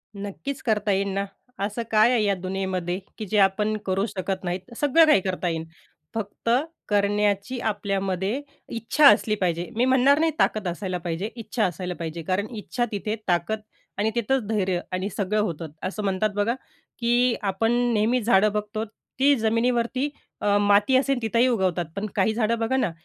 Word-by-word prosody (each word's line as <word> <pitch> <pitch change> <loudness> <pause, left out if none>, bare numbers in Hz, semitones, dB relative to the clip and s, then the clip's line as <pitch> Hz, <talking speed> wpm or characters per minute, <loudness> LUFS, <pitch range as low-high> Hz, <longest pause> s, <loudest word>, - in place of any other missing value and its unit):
नक्कीच 205 +8 -5
करता 210 -3 +1
येईन 195 +1 +1
ना. 195 +1 -1 0.3
असं 205 +4 -2
काय 220 +3 +5
आहे 230 -4 +2
या 200 -1 +2
दुनियेमध्ये 185 -1 -3 0.2
की 215 - -5
जे 210 +1 -1
आपण 210 +2 +3
करू 195 +2 +1
शकत 190 -2 -4
नाहीत. 180 +5 -4
सगळं 295 +3 +5
काही 305 -11 +5
करता 185 -1 -2
येईन, 160 -1 -3 0.5
फक्त 220 +1 -4 0.4
करण्याची 205 +3 +1
आपल्यामध्ये 200 +2 -1 0.3
इच्छा 235 +6 +4
असली 215 -2 +3
पाहिजे. 175 -3 -1
मी 240 +3 +2
म्हणणार 265 +3 +4
नाही 325 0 +3
ताकद 210 -4 +1
असायला 180 +1 -3
पाहिजे, 175 +4 -3
इच्छा 220 0 -1
असायला 180 0 -3
पाहिजे, 165 0 -4
कारण 190 +5 -1
इच्छा 240 +3 -2
तिथे 210 +1 -2
ताकद 180 +4 +1 0.4
आणि 210 +2 +1
तिथंच 240 +2 +1
धैर्य 190 -5 0
आणि 185 +2 -2
सगळं 205 +1 0
होतं. 165 -5 -3 0.2
असं 200 +3 -3
म्हणतात 195 +2 +1
बघा 205 +3 +1 0.5
की 240 +1 +3
आपण 205 +3 0 0.2
नेहमी 230 +4 +2
झाडं 210 -1 +4
बघतो, 210 +1 -2 0.3
ती 280 +1 +5
जमिनीवरती 235 +4 +1 0.3
अ, 205 0 +3
माती 205 +5 +4
असेल, 275 -1 +1
तिथंही 230 +3 +2
उगवतात. 185 -7 +1
पण 200 +2 -2
काही 215 +1 +2
झाडं 230 0 +1
बघा 230 +4 +1
ना, 260 - +1
210 Hz, 165 wpm, -25 LUFS, 190-230 Hz, 0.5 s, काय